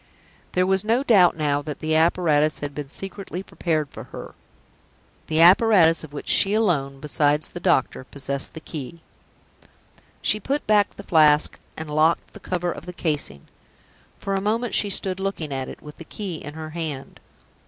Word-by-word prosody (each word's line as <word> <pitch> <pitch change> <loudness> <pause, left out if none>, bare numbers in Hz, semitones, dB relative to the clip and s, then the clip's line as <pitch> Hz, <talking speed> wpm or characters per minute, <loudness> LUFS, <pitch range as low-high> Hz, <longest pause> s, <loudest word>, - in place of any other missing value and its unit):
There 180 0 +2
was 190 +1 +1
no 230 +5 +1
doubt 190 -11 +5
now 145 -2 0
that 145 -1 -6
the 155 0 -1
apparatus 160 -2 +2
had 145 -1 -4
been 145 -2 -6
secretly 195 +1 -4
prepared 155 -6 -2
for - - -9
her - - -10 0.9
the 155 0 0
apparatus 180 -2 +6
of 155 - -10
which 145 - -8
she 200 +1 +4
alone 145 -11 0
(besides 150 +1 +1
the 175 - -8
doctor) 170 -7 +1
possessed 140 +2 -3
the 160 - -8
key. 155 +2 -8 1.2
She 210 - +2
put 275 +8 -2
back 210 -2 +2
the - - -10
Flask, 150 -2 +3 0.2
and 160 - -5
locked 155 +2 +1
the - - -11
cover 180 -1 -2
of - - -9
the 180 - -6
casing. 150 - -3 0.7
For 195 - -4
a 195 - 0
moment 225 +3 -1
she 205 - +3
stood 190 -1 -1
looking 190 -7 -3
at 130 -1 -4
it, - - -11
with 150 -1 -11
the - - -9
key 190 -1 -6
in 150 0 -9
her 155 -1 -7
hand. 155 -5 -6
160 Hz, 175 wpm, -23 LUFS, 150-190 Hz, 1.2 s, apparatus